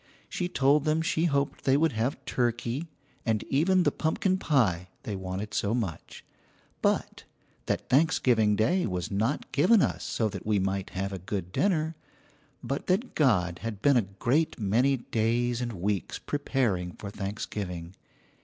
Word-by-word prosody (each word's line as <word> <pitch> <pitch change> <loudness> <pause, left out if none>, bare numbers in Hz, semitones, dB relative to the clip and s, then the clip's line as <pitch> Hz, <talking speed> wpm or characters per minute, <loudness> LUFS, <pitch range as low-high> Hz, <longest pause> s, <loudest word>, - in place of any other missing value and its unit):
She 180 -1 -3
told 140 -1 +3
them 155 +1 +1
she 165 0 +1
hoped 140 -3 0
they 135 0 +4
would 160 +1 +3
have 115 +4 -2
turkey 120 +5 -1 0.4
and 110 -3 0
even 180 +6 +3
the - - +3
pumpkin 185 +4 0
pie 105 - +2 0.2
they 105 - -4
wanted 95 +2 -5
so 105 +3 0
much, 100 -10 -5 0.6
but - - 0 0.4
that - - -1
Thanksgiving 125 -7 +3
Day 125 - +2
was 90 -3 -3
not 110 +8 -1
given 190 +9 +5
us - - -1
so 110 - 0
that 100 -2 -7
we 105 -1 +1
might 95 0 -1
have 100 +1 -2
a 95 - -4
good 95 0 -4
dinner, 160 - +1 0.7
but 135 +4 -3
that 200 +7 0
God 90 - +2
had 105 0 -5
been 140 -1 +5
a 120 - +5 0.2
great 145 +8 +1
many 120 +7 +2
days 120 +1 0
and 120 -1 -3
weeks 95 -1 -2
preparing 115 -11 -1
for 100 - -8
Thanksgiving. 95 -4 -5
120 Hz, 155 wpm, -28 LUFS, 100-145 Hz, 0.7 s, given